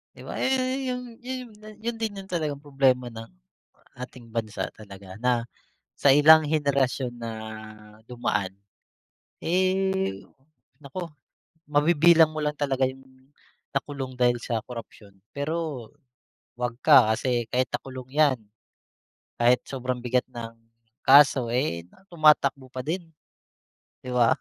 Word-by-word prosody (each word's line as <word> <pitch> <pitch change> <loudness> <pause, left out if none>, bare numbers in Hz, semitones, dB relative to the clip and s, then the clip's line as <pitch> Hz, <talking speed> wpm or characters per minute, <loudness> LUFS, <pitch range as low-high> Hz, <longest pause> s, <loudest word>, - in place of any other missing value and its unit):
Di - - -12
ba - - -6
yun, 260 -1 +1 0.2
yung 250 0 -3 0.2
yun, 255 -1 -6 0.3
yun 235 0 -2
din 220 -2 -2
yung 190 - -17
talagang 155 -5 -1
problema 130 -4 +1
ng, 115 0 -9 0.7
ating 125 -2 -10
bansa 110 -2 -3
talaga 100 -3 -12
na, 125 -1 +1 0.5
sa - - +1
ilang 155 +2 +8
henerasyon 140 -4 0
na 115 -1 -5 0.8
dumaan, 105 -6 -2 0.9
eh, 185 - 0 0.6
naku, 165 +5 -6 0.6
mabibilang 160 +2 +5
mo 155 - -6
lang 150 0 -1
talaga 135 -2 +1
yung, 130 +1 -7 0.7
nakulong 135 -1 -3
dahil 120 -1 +3
sa 115 -2 -2
korapsyon 115 -4 -10 0.2
pero, 145 -4 -3 0.7
wag 120 -1 -2
ka, 130 -8 +7
kasi 120 -1 -1
kahit 125 +1 +1
nakulong 130 -1 -6
yan, 145 -3 +3 1.0
kahit 120 +1 +4
sobrang 125 -2 -3
bigat 125 0 0
ng 115 -1 -7 0.5
kaso 135 -2 +7
eh, 90 - -1 0.2
tumatakbo 150 -5 +3
pa 130 0 -5
din. 165 +2 -4 0.9
Di 125 - -7
ba? 120 -2 +4
135 Hz, 120 wpm, -26 LUFS, 120-155 Hz, 1.0 s, ilang